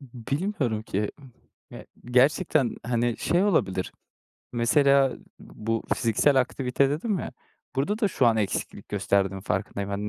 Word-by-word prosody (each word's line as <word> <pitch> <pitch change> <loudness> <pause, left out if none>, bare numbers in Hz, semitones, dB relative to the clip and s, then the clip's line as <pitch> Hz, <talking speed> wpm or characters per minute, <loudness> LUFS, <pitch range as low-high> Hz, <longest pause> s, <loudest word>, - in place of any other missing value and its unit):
Bilmiyorum 130 - -3
ki. 105 -1 -2 0.6
Ya - - -10 0.2
gerçekten, 130 +1 +2
hani, 120 -1 0
şey 175 +3 +2
olabilir. 95 - 0 0.6
Mesela 135 +2 +3 0.2
bu 115 +1 -4
fiziksel 130 +4 +3
aktivite 130 +1 0
dedim 185 +7 -1
ya - - -5 0.4
burada 200 +11 0
da 210 - +2
şu 135 -9 +2
an 115 -1 +4
eksiklik 105 -4 -3
gösterdiğim 95 -1 0
farkındayım. 100 0 -3
Hani, 100 +1 -3
125 Hz, 125 wpm, -26 LUFS, 105-140 Hz, 0.6 s, an